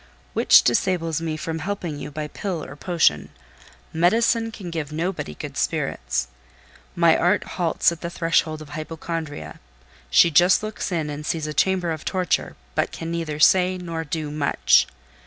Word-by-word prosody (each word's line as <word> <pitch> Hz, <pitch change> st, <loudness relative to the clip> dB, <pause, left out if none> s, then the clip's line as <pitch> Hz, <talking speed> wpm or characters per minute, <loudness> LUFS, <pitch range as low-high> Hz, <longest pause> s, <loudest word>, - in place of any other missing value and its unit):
"Which -, -, +6 dB
disables 165 Hz, +5 st, +1 dB
me 160 Hz, -1 st, -3 dB
from 160 Hz, +1 st, -4 dB
helping 175 Hz, -4 st, -4 dB
you 145 Hz, +1 st, -6 dB
by 150 Hz, +1 st, -5 dB
pill 170 Hz, +1 st, -4 dB
or 140 Hz, -, -10 dB
potion. 145 Hz, -, +1 dB, 0.6 s
Medicine 225 Hz, +7 st, +2 dB
can 190 Hz, -6 st, -8 dB
give 155 Hz, -3 st, -4 dB
nobody 165 Hz, -, -3 dB
good -, -, -7 dB
spirits. -, -, -1 dB, 0.7 s
My 170 Hz, -2 st, +5 dB
art 180 Hz, +4 st, +2 dB
halts 170 Hz, -1 st, +1 dB
at 170 Hz, -, -8 dB
the 170 Hz, -, -3 dB
threshold 165 Hz, -2 st, 0 dB
of 150 Hz, -, -15 dB
Hypochondria: 155 Hz, -, -6 dB, 0.5 s
she 165 Hz, -, +6 dB
just 180 Hz, +7 st, +5 dB
looks 215 Hz, -2 st, -4 dB
in 160 Hz, -4 st, -1 dB
and 145 Hz, +1 st, -6 dB
sees 160 Hz, -1 st, -2 dB
a 150 Hz, -, -4 dB
chamber 185 Hz, 0 st, +1 dB
of 155 Hz, -1 st, -5 dB
torture, 185 Hz, -2 st, -1 dB, 0.2 s
but -, -, 0 dB
can 165 Hz, 0 st, -6 dB
neither 165 Hz, -3 st, -3 dB
say 185 Hz, +3 st, +4 dB
nor 165 Hz, -2 st, -4 dB
do 155 Hz, -1 st, -4 dB
much. 150 Hz, -1 st, +3 dB
165 Hz, 160 wpm, -23 LUFS, 150-180 Hz, 0.7 s, Which